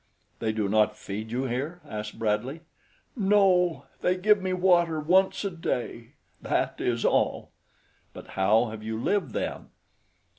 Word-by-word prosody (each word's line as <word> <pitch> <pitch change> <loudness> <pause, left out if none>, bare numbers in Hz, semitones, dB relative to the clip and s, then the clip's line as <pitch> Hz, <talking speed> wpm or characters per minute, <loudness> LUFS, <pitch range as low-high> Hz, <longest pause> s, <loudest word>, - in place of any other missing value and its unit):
"They 110 -1 0
do 110 -2 -1
not 105 +1 +2
feed 110 +1 -6
you 125 +3 -2
here?" 135 +7 -3
asked 105 0 -6
Bradley. 115 +8 -1 0.5
"No, 190 -5 +3
they 180 +1 +1
give 210 +2 +4
me 190 0 -2
water 175 -3 +3
once 190 +6 +2
a 200 - -1
day 125 -7 -4 0.3
that - - -1
is 120 -1 0
all." - - +1 0.6
"But - - -12
how 110 +4 +2
have 110 -1 -8
you 110 +1 -4
lived, 170 - 0
then?" - - -3
130 Hz, 145 wpm, -27 LUFS, 110-180 Hz, 0.6 s, give